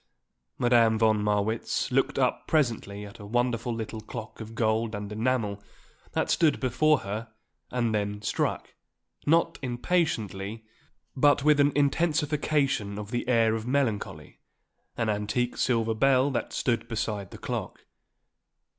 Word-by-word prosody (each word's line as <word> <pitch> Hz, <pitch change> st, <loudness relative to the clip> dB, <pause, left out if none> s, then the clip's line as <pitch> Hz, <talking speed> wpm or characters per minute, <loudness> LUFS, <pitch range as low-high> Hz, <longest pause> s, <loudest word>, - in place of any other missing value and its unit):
Madame 120 Hz, -2 st, +4 dB
von 110 Hz, -1 st, +3 dB
Marwitz 105 Hz, +2 st, 0 dB
looked -, -, +1 dB
up -, -, 0 dB
presently 115 Hz, -9 st, 0 dB
at 100 Hz, +1 st, -12 dB
a 105 Hz, -, -9 dB
wonderful 120 Hz, +1 st, 0 dB
little 110 Hz, -1 st, -5 dB
clock 110 Hz, +1 st, -8 dB
of 110 Hz, +1 st, -8 dB
gold 110 Hz, -1 st, 0 dB
and 105 Hz, 0 st, -6 dB
enamel 110 Hz, -2 st, -1 dB, 0.5 s
that -, -, 0 dB
stood 155 Hz, -4 st, +3 dB
before 145 Hz, +4 st, +2 dB
her 110 Hz, +3 st, -5 dB, 0.4 s
and 120 Hz, -3 st, 0 dB
then 105 Hz, -1 st, -1 dB
struck, 105 Hz, -, -2 dB, 0.5 s
not 165 Hz, +2 st, +3 dB
impatiently, 115 Hz, -, -1 dB, 0.5 s
but 145 Hz, +1 st, +4 dB
with 150 Hz, -1 st, +4 dB
an 145 Hz, 0 st, +5 dB
intensification 145 Hz, -6 st, +1 dB
of 105 Hz, +1 st, -7 dB
the 120 Hz, -1 st, -2 dB
air 115 Hz, -3 st, +3 dB
of 110 Hz, +1 st, -3 dB
melancholy, 105 Hz, -, -2 dB, 0.6 s
an 115 Hz, -, 0 dB
antique 110 Hz, +4 st, -1 dB
silver 115 Hz, -3 st, +1 dB
bell 135 Hz, +4 st, +3 dB
that 125 Hz, -, -2 dB
stood 115 Hz, -2 st, -1 dB
beside 110 Hz, -4 st, -3 dB
the -, -, -10 dB
clock. -, -, -5 dB
115 Hz, 135 wpm, -27 LUFS, 105-130 Hz, 0.6 s, an